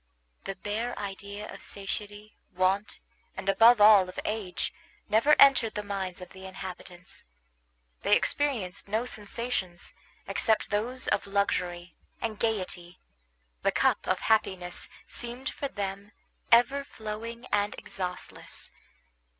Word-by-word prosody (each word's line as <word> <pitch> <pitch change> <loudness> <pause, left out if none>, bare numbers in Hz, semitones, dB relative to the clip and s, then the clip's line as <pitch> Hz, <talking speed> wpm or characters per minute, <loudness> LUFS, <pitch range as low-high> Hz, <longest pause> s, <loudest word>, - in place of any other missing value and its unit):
The 195 - -4
bare 215 +5 -3
idea 200 +1 -6
of - - -10
satiety, 205 +1 -5 0.2
want, 190 +3 0 0.4
and, - - -6
above 225 +4 +7
all, 205 -3 +8
of 185 - -6
age, 210 -4 -2 0.3
never 230 +8 +5
entered 250 -5 +6
the 210 - -2
minds 195 -3 -4
of 180 - -9
the 190 0 -10
inhabitants. 185 0 -8 0.8
They - - +5
experienced 225 -12 -1
no 220 +4 0
sensations 210 -5 -3 0.3
except 220 -3 +1
those 235 +5 0
of 200 - +1
luxury 180 -3 -1 0.2
and 220 -2 -3
gayety; 185 -5 -2 0.6
the - - +2
cup - - +2
of - - +1
happiness 190 -5 0 0.2
seemed 245 +3 -5
for 280 - -3
them 200 -2 -5 0.4
ever 255 +4 +5
flowing 230 -1 -7
and 205 0 +1
exhaustless. 180 -2 -6
205 Hz, 120 wpm, -29 LUFS, 190-225 Hz, 0.8 s, all